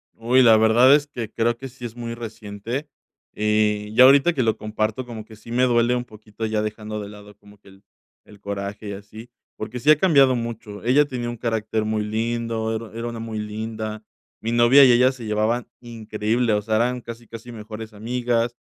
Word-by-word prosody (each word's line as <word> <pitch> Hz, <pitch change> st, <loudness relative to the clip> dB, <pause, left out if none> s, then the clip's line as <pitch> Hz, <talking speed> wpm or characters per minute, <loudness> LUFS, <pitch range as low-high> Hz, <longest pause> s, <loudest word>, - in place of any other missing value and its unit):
Uy, 125 Hz, +3 st, +3 dB
la 110 Hz, -2 st, +7 dB
verdad 115 Hz, +5 st, +6 dB
es 145 Hz, 0 st, 0 dB
que 120 Hz, -6 st, -6 dB
creo 120 Hz, +1 st, 0 dB
que 135 Hz, -, -7 dB
sí 125 Hz, -1 st, -10 dB
es 115 Hz, 0 st, -7 dB
muy 120 Hz, -1 st, -5 dB
reciente. 115 Hz, +4 st, -6 dB, 0.5 s
Y, 105 Hz, 0 st, 0 dB
ya 125 Hz, -, +8 dB
ahorita 140 Hz, +6 st, +6 dB
que 130 Hz, -, 0 dB
lo 110 Hz, -1 st, +1 dB
comparto 110 Hz, +3 st, -2 dB
como 110 Hz, -2 st, -8 dB
que 110 Hz, -1 st, -14 dB
sí 115 Hz, +2 st, -13 dB
me 125 Hz, +1 st, +2 dB
duele 120 Hz, 0 st, +3 dB
un 120 Hz, 0 st, -3 dB
poquito 110 Hz, 0 st, -8 dB
ya 110 Hz, -1 st, 0 dB
dejando 105 Hz, 0 st, -5 dB
de 100 Hz, -1 st, -7 dB
lado 105 Hz, -1 st, -13 dB
como 105 Hz, 0 st, -19 dB
que 100 Hz, -, -20 dB
el 95 Hz, +1 st, -19 dB, 0.4 s
el 105 Hz, -1 st, -17 dB
coraje 100 Hz, +1 st, -5 dB
y -, -, -4 dB
así, 105 Hz, +4 st, -11 dB, 0.3 s
porque 120 Hz, +3 st, -6 dB
sí 150 Hz, -, +1 dB
ha 155 Hz, -, +6 dB
cambiado 140 Hz, -7 st, +5 dB
mucho. 115 Hz, -3 st, -6 dB
Ella 140 Hz, +4 st, +5 dB
tenía 120 Hz, -3 st, -4 dB
un 120 Hz, -, -5 dB
carácter 110 Hz, -2 st, -2 dB
muy 110 Hz, 0 st, -1 dB
lindo, 115 Hz, 0 st, -2 dB
era 110 Hz, 0 st, -6 dB
era 115 Hz, +1 st, -4 dB
una 115 Hz, -, -7 dB
muy 110 Hz, -1 st, -5 dB
linda. 110 Hz, 0 st, -5 dB, 0.4 s
Mi 115 Hz, -, -2 dB
novia 120 Hz, +4 st, +7 dB
y 125 Hz, -, +6 dB
ella 125 Hz, +2 st, +5 dB
se 125 Hz, -3 st, -10 dB
llevaban 110 Hz, +3 st, 0 dB
increíble, 115 Hz, 0 st, -1 dB
o 105 Hz, -, +1 dB
sea, 110 Hz, +1 st, 0 dB
eran 125 Hz, +1 st, 0 dB
casi, 115 Hz, 0 st, -10 dB
casi 115 Hz, +2 st, -10 dB
mejores 110 Hz, 0 st, -8 dB
amigas. 120 Hz, +2 st, -1 dB
115 Hz, 210 wpm, -23 LUFS, 105-120 Hz, 0.5 s, ya